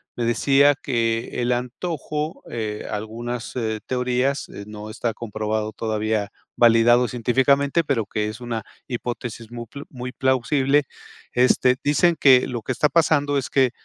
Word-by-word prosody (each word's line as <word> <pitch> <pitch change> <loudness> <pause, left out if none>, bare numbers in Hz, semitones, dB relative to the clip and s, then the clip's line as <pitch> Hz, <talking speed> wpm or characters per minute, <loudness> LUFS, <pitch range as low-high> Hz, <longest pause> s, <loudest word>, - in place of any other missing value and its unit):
me 120 - -2
decía 140 +5 +4
que 115 -2 -1
el 120 +1 +1
antojo, 150 +4 -4
eh, 110 -2 -4
algunas, 115 +3 -5
eh, 110 -3 -2
teorías, 125 +2 0
eh, 100 - -9
no 105 0 -8
está 115 +1 -2
comprobado 110 -1 -3
todavía, 110 -1 -1 0.3
validado 120 +1 +5
científicamente, 135 +6 +2
pero 135 -8 0
que 105 +2 -2
es 110 +2 -8
una 120 -2 -4 0.3
hipótesis 120 -2 -5
muy 120 0 -6
pl 140 +5 -10
muy 125 -1 -6
plausible. 135 +3 +2 0.5
Este, 125 0 +3
dicen 165 +4 +3
que 130 -2 +6
lo 120 -2 -4
que 130 - -4
está 150 +4 +2
pasando 145 -2 +2
es 135 - -5
que, 130 -3 +3
120 Hz, 145 wpm, -23 LUFS, 115-135 Hz, 0.5 s, que